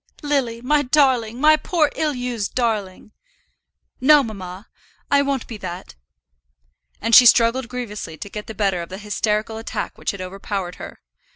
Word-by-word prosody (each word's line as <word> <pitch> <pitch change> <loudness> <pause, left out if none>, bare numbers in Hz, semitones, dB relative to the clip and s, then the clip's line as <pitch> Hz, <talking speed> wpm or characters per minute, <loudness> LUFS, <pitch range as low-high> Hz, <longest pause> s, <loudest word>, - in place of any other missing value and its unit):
"Lily, 265 -6 -1
my 295 +3 +3
darling; 255 -5 +2
my 310 +2 +6
poor, 310 -2 0
ill 305 -3 -1
used 245 -4 -4
darling." 215 -5 -2 0.9
"No, 290 +2 +6
mamma, 195 -3 -8 0.4
I 280 0 +5
won't 275 -3 -1
be 225 - -8
that." 180 -2 -8 1.1
And 230 +2 -2
she 245 +2 +10
struggled 235 +2 +4
grievously 210 -9 -6
to - - -7
get 210 +1 -8
the 220 - -8
better 195 -3 0
of 170 - -8
the 190 - -7
hysterical 210 +1 -2
attack 225 - -5
which - - -3
had 200 - -4
overpowered 190 0 -5
her. - - -10
230 Hz, 160 wpm, -21 LUFS, 200-260 Hz, 1.1 s, she